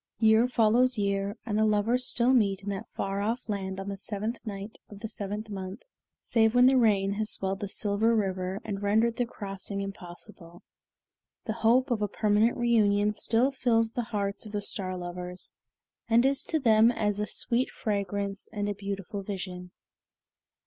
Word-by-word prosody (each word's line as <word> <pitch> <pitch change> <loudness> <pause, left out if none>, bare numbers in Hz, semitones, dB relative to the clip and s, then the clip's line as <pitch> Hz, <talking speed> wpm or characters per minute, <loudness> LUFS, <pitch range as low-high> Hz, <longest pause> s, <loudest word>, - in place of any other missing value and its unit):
Year 220 +1 +5
follows 245 +1 +3
year, 200 +1 -1
and 215 -2 -1
the - - +4
lovers 220 +4 +2
still 245 +2 +3
meet 200 -5 +2
in 200 - -4
that 195 -1 -5
far 195 0 -3
off 230 +4 -2
land 195 -2 -3
on 195 - -6
the 200 -1 -5
seventh 215 +4 -4
night 200 +1 -7
of 205 -1 -12
the 220 - -3
seventh 210 +1 -5
month, 190 +1 -6 0.3
save 220 0 +2
when 245 0 +7
rain 200 -4 +3
has 215 - -1
swelled 195 -1 -2
the 205 - -3
Silver 210 +3 +1
River 190 -2 -1
and 200 -1 -4
rendered 220 +3 +2
the 245 - 0
crossing 200 -2 -6
impossible. 175 -2 -9 0.8
The 220 - -1
hope 250 +4 +3
of 225 -3 0
a 210 - +1
permanent 210 +3 +2
reunion 210 -4 +3
still 230 +5 +2
fills 230 -4 +1
the 240 0 -3
hearts 200 -2 -2
of 215 -1 -10
the 205 - -1
Star 185 -2 -3
Lovers, 180 0 -6 0.6
and 235 +2 +5
is 275 0 +2
to 320 - 0
them 225 -3 +5
as 210 -3 -1
a 210 - -1
sweet 240 +6 0
fragrance 200 -1 -3
and 205 -2 -2
a 205 - -1
beautiful 200 0 -5
vision. 185 -2 -6
210 Hz, 175 wpm, -28 LUFS, 195-225 Hz, 0.8 s, when